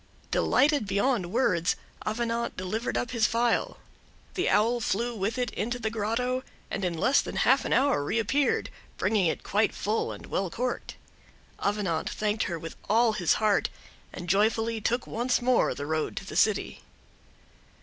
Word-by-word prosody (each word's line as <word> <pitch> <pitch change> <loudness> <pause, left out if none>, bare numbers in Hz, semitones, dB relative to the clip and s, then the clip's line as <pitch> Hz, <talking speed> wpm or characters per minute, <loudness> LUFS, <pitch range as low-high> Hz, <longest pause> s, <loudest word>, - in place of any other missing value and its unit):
Delighted 280 -3 +3
beyond 200 -1 +1
words, 185 -7 +2 0.3
Avenant 230 +1 -1
delivered 200 +6 -2
up 245 - -2
his 230 -4 +3
phial; 235 0 +1 0.6
the 370 - 0
Owl 230 +3 +3
flew 235 +2 -1
with 210 +3 -2
it 250 -1 -1
into 240 +4 -2
the 220 -2 -2
grotto, 230 +4 -1 0.3
and 195 - -3
in 175 -2 -1
less 260 - +4
than - - -7
half 265 +2 +3
an - - -3
hour 260 - +3
reappeared, 230 - +1 0.3
bringing 205 -5 +2
it 160 - -2
quite 210 +2 +1
full 215 +2 -1
and - - -9
well 190 -1 -2
corked. 250 +7 -3 0.6
Avenant 200 -6 -1
thanked 210 0 -1
her 170 - -3
with 165 +1 -8
all 225 +1 +4
his 175 -5 +2
heart, 210 -2 +2 0.4
and 180 - -8
joyfully 220 +4 +2
took 240 +3 0
once 240 +2 0
more 250 0 +2
the 145 - -5
road 155 +1 -2
to 195 - -4
the - - -8
city. 215 -2 +1
220 Hz, 160 wpm, -28 LUFS, 195-240 Hz, 0.6 s, less